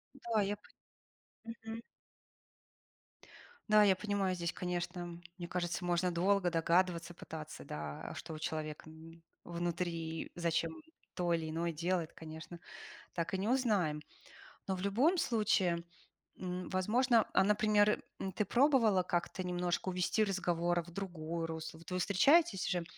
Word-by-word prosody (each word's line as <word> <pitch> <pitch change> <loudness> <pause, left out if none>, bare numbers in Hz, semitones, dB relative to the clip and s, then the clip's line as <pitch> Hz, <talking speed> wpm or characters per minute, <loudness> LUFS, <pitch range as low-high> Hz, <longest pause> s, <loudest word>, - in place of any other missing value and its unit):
Да, 235 -5 0
я 205 +1 0
пон 210 - -22 0.9
Мгм. 225 +1 -5 1.9
Да, 215 0 +7
я 195 -2 +5
понимаю, 200 -2 0
здесь, 170 -1 -2
конечно, 175 -1 -4 0.2
мне 175 - -5
кажется, 175 0 -2
можно 175 +1 +2
долго 180 +1 +2
догадываться, 170 +1 +2
пытаться, 160 -2 -8
да, 75 -1 -6
а - - -7
что 165 -1 -6
у 155 - -6
человека 155 0 -4 0.6
внутри, 170 -1 -2
и - - -15
зачем 170 - -1 0.3
то 175 -1 +1
или 160 -1 -1
иное 170 +2 -1
делает, 170 +1 -1
конечно, 160 +2 -9 0.5
так 170 +1 -2
и 190 - +2
не 195 - -1
узнаем. 205 - +2 0.7
Но 190 - 0
в 185 - -6
любом 255 - +3
случае, 195 - +2 0.5
м, 180 -1 -4
возможно, 225 +5 +3
например, 210 +1 +4 0.3
ты 210 - +2
пробовала 235 -6 +4
как-то 180 +1 -1
немножко 180 0 -1
увести 180 +4 +2
разговор 175 -3 +1
в 170 - -13
другое 170 -3 -4
русло? 160 0 -6
Вот 165 - -12
вы 180 - -1
встречаетесь 200 - +4
уже, 175 -2 0
180 Hz, 135 wpm, -34 LUFS, 170-200 Hz, 1.9 s, Да